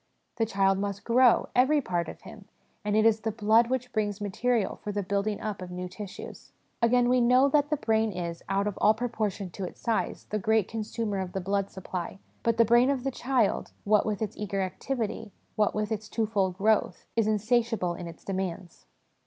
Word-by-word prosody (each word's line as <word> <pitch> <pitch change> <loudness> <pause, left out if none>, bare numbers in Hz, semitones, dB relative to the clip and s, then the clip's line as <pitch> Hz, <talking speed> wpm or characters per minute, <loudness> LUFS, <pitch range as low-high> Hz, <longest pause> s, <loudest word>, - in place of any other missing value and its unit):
The 225 -1 +1
child 195 -2 +2
must 200 0 -3
grow, 245 +1 +4
every 270 +5 +4
part 175 -10 -2
of - - -10
him, - - -12 0.4
and 205 0 0
it 220 - +4
is 220 -1 +4
the 220 - -2
blood 220 +2 +3
which 250 -1 -2
brings 205 -2 -1
material 210 +1 0
for 210 - -3
the 205 0 -2
building 200 +2 -1
up 215 -3 -4
of 180 - -6
new 180 0 -5
tissues. 190 +1 -9 0.3
Again, 240 +1 +4
we 250 0 +3
know 250 +3 +5
that 290 0 +2
the 300 - +1
brain 220 -2 +1
is, 170 -2 -5
out 195 +1 +1
of 210 -2 -2
all 215 - +5
proportion 215 -5 -3
to 195 - -6
its 180 - -7
size, 230 -2 -1
the 215 - 0
great 220 0 +2
consumer 220 -2 -3
of 185 -1 -4
the 195 - -1
blood 195 +1 -1
supply, 185 -1 -6 0.2
but 230 -1 +1
the 230 - +6
brain 240 +3 +5
of 270 -3 0
the 270 - -1
child, 245 -4 0
what 210 +1 +3
with 215 0 -1
its 210 - -4
eager 200 -2 -2
activity, 220 +2 -4 0.2
what 210 -1 +1
with 215 +1 -1
its 215 -1 -3
twofold 205 -5 0
growth, 215 +2 +1
is 225 -2 +2
insatiable 220 -3 +1
in 175 - -7
its 165 - -11
demands 185 - -5
215 Hz, 200 wpm, -28 LUFS, 195-230 Hz, 0.4 s, the